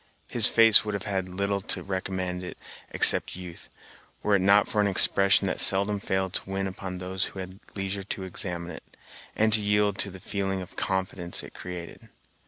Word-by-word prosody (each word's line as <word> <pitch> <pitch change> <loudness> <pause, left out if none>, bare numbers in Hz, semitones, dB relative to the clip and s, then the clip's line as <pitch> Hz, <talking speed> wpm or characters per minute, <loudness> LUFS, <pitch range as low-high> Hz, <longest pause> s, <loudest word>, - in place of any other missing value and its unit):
His - - +9
face 115 -2 +6
would 105 -1 -4
have 100 - -5
had 95 -2 -3
little 100 +2 -3
to - - +1
recommend 95 -1 -4
it 90 - -9 0.3
except - - +3
youth, 90 -2 -11 0.5
were 105 - 0
it 100 - +4
not 100 +2 +4
for 105 -4 0
an 100 - +1
expression 100 0 +4
that 95 - -2
seldom 100 +1 +4
failed 95 -1 -3
to - - -5
win 95 0 -3
upon 95 -1 -7
those 95 +1 -3
who 95 - -9
had 95 +1 -9 0.2
leisure 95 0 -4
to 95 0 -6
examine 90 -2 -4
it, 80 - -14 0.4
and 110 0 +1
to 110 - +2
yield 105 -1 0
to 100 - -1
the 95 0 -12
feeling 95 0 -4
of 90 0 -10
confidence 95 -2 -2
it - - -12
created. 90 -2 -10
95 Hz, 190 wpm, -26 LUFS, 95-100 Hz, 0.5 s, His